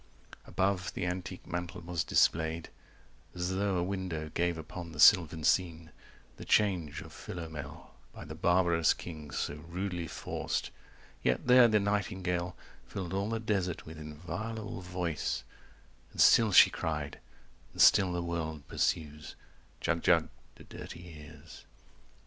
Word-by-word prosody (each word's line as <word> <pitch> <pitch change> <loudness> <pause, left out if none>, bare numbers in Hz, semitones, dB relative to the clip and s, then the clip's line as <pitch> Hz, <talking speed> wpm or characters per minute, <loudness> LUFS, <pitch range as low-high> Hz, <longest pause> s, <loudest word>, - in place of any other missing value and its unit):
Above 95 -1 0
the 90 - -2
antique 90 +1 -5
mantel 90 +1 -4
was 85 -1 -2
displayed 80 0 +1 0.7
As 90 +1 -2
though 100 0 0
a 85 - +1
window 90 -5 -3
gave 85 0 0
upon 85 +1 -8
the 75 - -10
sylvan 80 -3 +6
scene 85 -1 +1 0.5
The - - -8
change 85 -7 +1
of 80 0 -12
Philomel, 80 -4 -8 0.2
by - - -10
the 80 - -7
barbarous 85 0 +3
king 75 -4 -9
So 70 - -3
rudely 90 -1 -3
forced; - - -3 0.5
yet - - 0
there 125 -1 +7
the 110 -2 +3
nightingale 95 -3 -1 0.3
100 - - -29
Filled 95 -2 -5
all 100 +2 -1
the 115 0 -1
desert 100 -6 -2
with 80 0 -9
inviolable 90 +7 -6
voice 90 -3 -3 0.7
And - - -12
still 115 -3 +6
she - - +8
cried, 75 -3 -3 0.5
and - - -14
still 95 -3 +6
the 90 0 -2
world 80 -3 -4
pursues, 75 0 -2 0.5
"Jug 85 -1 0
Jug" 85 -3 +3 0.3
to - - -14
dirty 85 -1 -10
ears. 75 +1 -13
85 Hz, 140 wpm, -31 LUFS, 80-95 Hz, 0.7 s, she